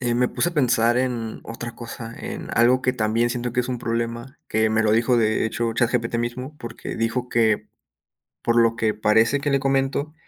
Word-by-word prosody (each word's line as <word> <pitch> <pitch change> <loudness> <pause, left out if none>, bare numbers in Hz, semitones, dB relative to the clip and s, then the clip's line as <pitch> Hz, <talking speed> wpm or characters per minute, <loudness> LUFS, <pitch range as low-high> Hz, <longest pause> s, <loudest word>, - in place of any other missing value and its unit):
Eh, 120 -1 0
me 125 +1 +2
puse 125 +8 0
a - - -14
pensar 120 -4 +3
en 120 -3 -2
otra 115 +1 -7
cosa, 115 -1 -8
en - - -6
algo 125 +3 +4
que 130 - +2
también 115 0 +1
siento 120 0 -3
que 125 - +1
es 125 - -4
un 125 -2 -2
problema, 115 +2 -3
que 110 0 +2
me 110 +1 +2
lo 105 - +3
dijo, 115 +2 +3
de 110 -2 +2
hecho, 115 +1 -1
ChatGPT 120 0 0
mismo, 125 +5 -4
porque 115 0 -7
dijo 120 +2 -1
que, 110 -3 +1 0.7
por 115 - +1
lo 115 -1 +4
que 110 -2 0
parece 110 +6 +3
que 145 +1 -1
le 140 - +3
comento, 135 +2 0
120 Hz, 205 wpm, -23 LUFS, 115-125 Hz, 0.7 s, algo